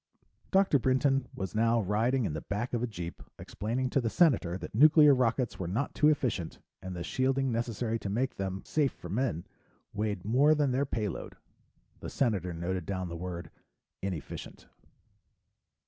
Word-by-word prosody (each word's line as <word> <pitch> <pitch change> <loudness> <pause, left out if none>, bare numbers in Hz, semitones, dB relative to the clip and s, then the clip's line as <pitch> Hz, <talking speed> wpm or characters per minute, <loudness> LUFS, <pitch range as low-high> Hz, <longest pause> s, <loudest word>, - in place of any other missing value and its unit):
Dr. 190 -7 +4
Brinton 130 +1 +2
was 95 -1 -4
now 115 +1 +3
riding 115 +5 +1
in 75 - -2
the 75 - -4
back 105 +5 -3
of 120 - 0
a 125 - 0
jeep, 90 -6 -7 0.2
explaining 120 +6 -3
to 135 - +2
the 115 - 0
Senator 120 - +3
that - - -8
nuclear 150 +4 +7
rockets 125 -1 0
were 90 - -3
not 110 +11 -2
too 150 - +3
efficient, 120 - 0 0.2
and 95 -1 -6
the 85 - -4
shielding 135 +3 0
necessary 115 0 -2
to 100 - -5
make 125 +6 -1
them 95 0 -3
safe 145 -3 +1
for - - -10
men 110 - -1 0.5
weighed 105 -3 -2
more 140 +8 +4
than 145 -3 +1
their 135 +2 0
payload. 105 -7 -4 0.6
The - - -6
Senator 100 - 0
noted 85 +1 -3
down 95 -2 -3
the 85 - -6
word 85 -1 -6 0.5
"inefficient." 90 -7 -6
115 Hz, 165 wpm, -30 LUFS, 95-130 Hz, 0.6 s, nuclear